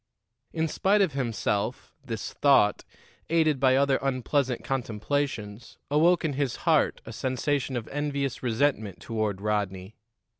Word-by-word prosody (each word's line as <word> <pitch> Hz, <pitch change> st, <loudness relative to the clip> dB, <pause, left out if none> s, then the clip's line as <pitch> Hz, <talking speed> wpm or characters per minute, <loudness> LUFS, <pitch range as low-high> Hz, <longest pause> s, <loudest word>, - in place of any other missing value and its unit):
In 160 Hz, 0 st, 0 dB
spite 200 Hz, +6 st, +2 dB
of 175 Hz, -7 st, -1 dB
himself, 115 Hz, -2 st, -2 dB
this 115 Hz, -5 st, -5 dB
thought, 135 Hz, -8 st, +4 dB, 0.5 s
aided 155 Hz, -4 st, +2 dB
by 130 Hz, 0 st, +4 dB
other 135 Hz, 0 st, +3 dB
unpleasant 130 Hz, -1 st, 0 dB
contemplations, 115 Hz, -3 st, -3 dB
awoke 165 Hz, +4 st, +4 dB
in 150 Hz, -, 0 dB
his 135 Hz, -2 st, -1 dB
heart -, -, +3 dB
a -, -, -8 dB
sensation 130 Hz, +1 st, -1 dB
of 115 Hz, -, -5 dB
envious 140 Hz, -2 st, -2 dB
resentment 115 Hz, -5 st, 0 dB
toward 110 Hz, -4 st, -2 dB
Rodney. 100 Hz, -2 st, -2 dB
130 Hz, 125 wpm, -27 LUFS, 110-145 Hz, 0.5 s, thought